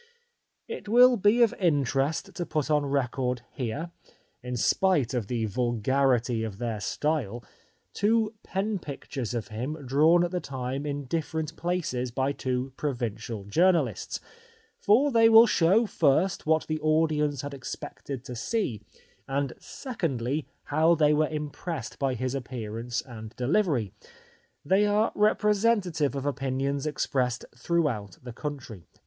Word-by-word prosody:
It 460 - -7
will 250 +2 +7
be 220 +3 +4
of 230 0 +3
interest 145 -3 +1
to 180 - -3
put 155 -2 -2
on 150 -1 +2
record 125 -2 -1
here 140 +7 -4 0.2
— - - -39
in 125 0 -4
spite 150 -1 +2
of 120 -5 -2
the 115 -1 -1
vulgarity 120 +1 +1
of 105 -3 -5
their 115 -2 -3
style 120 -1 -2 0.3
— - - -42
two 220 +1 +2
pen 195 +2 -2
pictures 135 -5 -5
of 115 - -4
him 135 +7 -5
drawn 155 +7 +4
at 175 - -1
the 180 - -1
time 135 0 -4
in 145 -1 -3
different 160 +2 -3
places 170 -9 -2
by 130 +3 0
two 130 -1 -3
provincial 115 -6 -3
journalists, 150 - +1 0.6
for 260 +8 +4
they 225 -2 +6
will 225 +1 +9
show 195 +2 +3
first 160 -1 +1
what 160 0 +3
the 155 0 -2
audience 155 -2 +1
had 145 0 -6
expected 135 0 -7
to 125 - -6
see, 130 - -2 0.5
and 135 -1 -1
secondly 150 - -3 0.2
how 160 +3 +3
they 150 -1 +4
were 155 0 +2
impressed 150 -2 -5
by 135 -2 0
his 130 +2 -2
appearance 120 -2 -4
and 110 -3 -10
delivery. 130 - +1 0.7
They 195 +6 +3
are 210 +2 +2
repre 210 0 +3
sentative 185 -10 +1
of 135 0 -3
opinions 140 0 -1
expressed 130 -4 -1
throughout 120 - -1
the 125 -2 -8
country. 120 - -7
140 Hz, 140 wpm, -27 LUFS, 125-170 Hz, 0.7 s, will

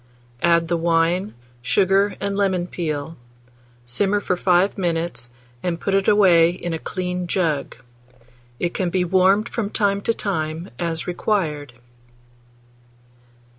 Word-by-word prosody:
Add 170 -1 +3
the 170 0 0
wine, 170 +4 +1 0.3
sugar, 195 +7 +2
and 200 0 -2
lemon 190 -3 +1
peel; 160 -3 -4 0.7
simmer 195 +12 +1
for 185 - -1
5 180 +2 +2
minutes, 170 - -2 0.3
and 170 -2 -2
put 195 - -2
it 195 0 +2
away 180 -5 +6
in 175 -1 -4
a 160 - -3
clean 180 0 -3
jug. 160 -6 -1 0.8
It 175 -1 -1
can 185 -2 -1
be 180 0 0
warmed 190 +4 +3
from 215 -4 -3
time 200 -2 0
to 230 - +1
time, 160 -3 -3
as 165 -1 -2
required. 165 - -2
180 Hz, 130 wpm, -22 LUFS, 165-195 Hz, 0.8 s, away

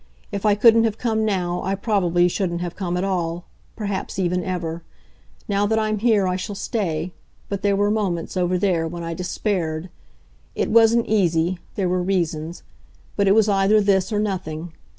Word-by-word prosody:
If 200 +1 -1
I 205 - +4
couldn't 225 +1 +6
have 220 -1 -1
come 220 -2 0
now 180 -4 -1
I 195 +2 -1
probably 180 -5 +2
shouldn't 175 -1 -2
have 175 -1 -4
come 180 -3 -2
at 180 - -1
all 175 -3 -2 0.3
perhaps 200 -4 -4
even 180 -1 0
ever. 170 -2 -3 0.7
Now 205 -1 +1
that 220 +1 +1
I'm 215 -1 0
here 215 -4 +3
I 180 0 0
shall 205 +2 -5
stay, 180 -5 -2 0.4
but 200 -1 -3
there 200 -1 +2
were 205 +1 +2
moments, 195 -7 -2
over 180 0 +1
there, 175 -4 +1
when 170 +1 -6
I 165 0 -3
despaired. 180 -2 -2 0.6
It - - -1
wasn't 230 +1 +5
easy 175 -4 +1 0.2
there 195 -3 0
were 180 0 0
reasons; 170 -3 -2 0.5
but 200 -1 +2
it 195 - +5
was 220 -1 +4
either 200 +1 +4
this 195 0 +2
or 210 - 0
nothing. 175 -5 -3
190 Hz, 180 wpm, -22 LUFS, 175-205 Hz, 0.7 s, couldn't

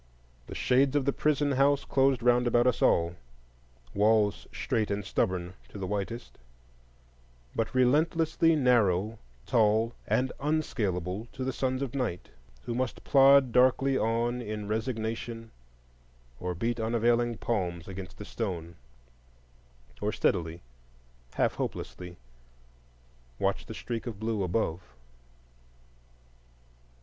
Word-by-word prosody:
The - - -8
shades 135 +2 +2
of 145 -3 +2
the 140 - +1
prison 145 -1 +1
house 140 +1 +3
closed 135 -2 +2
round 125 0 +4
about 120 0 +3
us 125 - +1
all: 85 0 +2 0.8
walls 105 0 +2
strait 115 -5 -1
and 100 -1 -2
stubborn 90 -4 -1 0.2
to - - -10
the 95 - -4
whitest, 105 +5 -4 1.2
but 115 +3 -2
relentlessly 160 +5 +3
narrow, 110 - +2 0.3
tall, 110 +1 +2
and 130 +1 +1
unscalable 110 - -1
to 130 0 -2
sons 130 +1 -1
of 135 -2 -5
night 125 -10 -3 0.3
who 120 - -4
must 125 0 -3
plod 135 -2 +6
darkly 130 +2 +4
on 120 +1 0
in 105 -2 -5
resignation, 115 0 -3 0.9
or 90 0 -3
beat 115 +6 -2
unavailing 115 +1 +1
palms 90 -8 -2
against 95 -1 -8
the 105 - -8
stone, 85 -8 -5 1.2
or - - 0
steadily, 85 0 0 0.7
half - - +2
hopelessly, 90 -1 -5 1.2
watch - - -1
the - - -7
streak 120 +1 -5
of 110 -4 -6
blue 110 -1 -1
above. 90 -2 -1
115 Hz, 115 wpm, -29 LUFS, 100-130 Hz, 1.2 s, plod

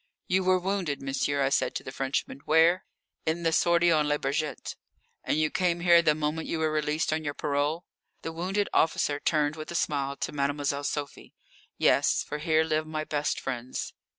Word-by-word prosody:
"You 190 +1 +2
were 185 0 +4
wounded, 185 -5 -2
monsieur," 140 +1 -1
I 135 - +2
said - - 0
to - - -3
the 130 - -7
Frenchman. 135 0 -2
"Where?" 165 +3 +4 0.4
"In 165 +2 0
the 165 - +2
sortie 170 +1 +4
on 155 -2 +3
Le 150 0 +2
Bourget." 145 +1 -3 0.5
"And - - 0
you 155 -1 +1
came 175 -2 0
here 170 -1 +6
the 155 -2 +3
moment 155 +1 -2
you 165 - -2
were 160 -1 0
released 155 +1 0
on 155 0 -2
your 145 -1 -3
parole?" 145 +4 -1 0.4
The 165 - -3
wounded 190 +5 -1
officer 150 -2 +2
turned 150 -1 +1
with 155 -1 -8
a 170 - -5
smile 140 -3 -1
to - - -3
Mademoiselle 145 0 -1
Sophie. 145 -1 -5 0.4
"Yes, - - +3
for 150 - -5
here 160 0 +2
live 155 0 -1
my 155 0 -3
best 150 -1 -1
friends." 125 -1 -4
155 Hz, 190 wpm, -28 LUFS, 145-165 Hz, 0.5 s, here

